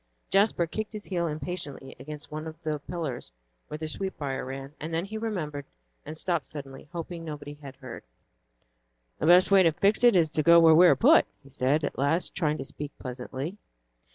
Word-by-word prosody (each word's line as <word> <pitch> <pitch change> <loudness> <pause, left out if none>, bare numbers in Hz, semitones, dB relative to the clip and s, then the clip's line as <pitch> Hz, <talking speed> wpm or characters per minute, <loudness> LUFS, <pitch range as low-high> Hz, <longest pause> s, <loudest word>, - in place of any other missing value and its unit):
Jasper 195 -3 +3
kicked 215 +7 -5
his 210 -1 -6
heel 175 -3 -1
impatiently 150 -3 -6
against 150 +3 -8
one 155 +1 -5
of 160 0 -9
the 155 -1 -2
pillars 145 - -5 0.4
where 150 - -6
the 155 0 -5
sweetbrier 150 -6 -4
ran; 135 +2 -7
then 165 +3 -2
he 210 +2 -8
remembered, 170 -11 -3 0.4
and 155 - -6
stopped 170 -5 -1
suddenly, 140 -1 -9
hoping 170 0 -6
nobody 150 -2 -7
had 140 -2 -11
heard. 130 -3 -9 1.2
"The 155 - 0
best 180 +3 +6
way 195 -1 +7
to 165 -3 +5
fix 200 +8 +2
it 240 -4 +7
is 165 -4 +3
to 155 - +1
go 170 +2 +7
where 165 -1 +7
we 175 +3 +8
are - - +6
put," 295 +8 +5 0.2
he 140 - -17
said 140 +3 +1
at 145 - -3
last, 145 +6 +1
trying 155 -3 0
to 135 - -5
speak 145 +1 -8
pleasantly. 130 +7 -6
155 Hz, 190 wpm, -27 LUFS, 145-175 Hz, 1.2 s, we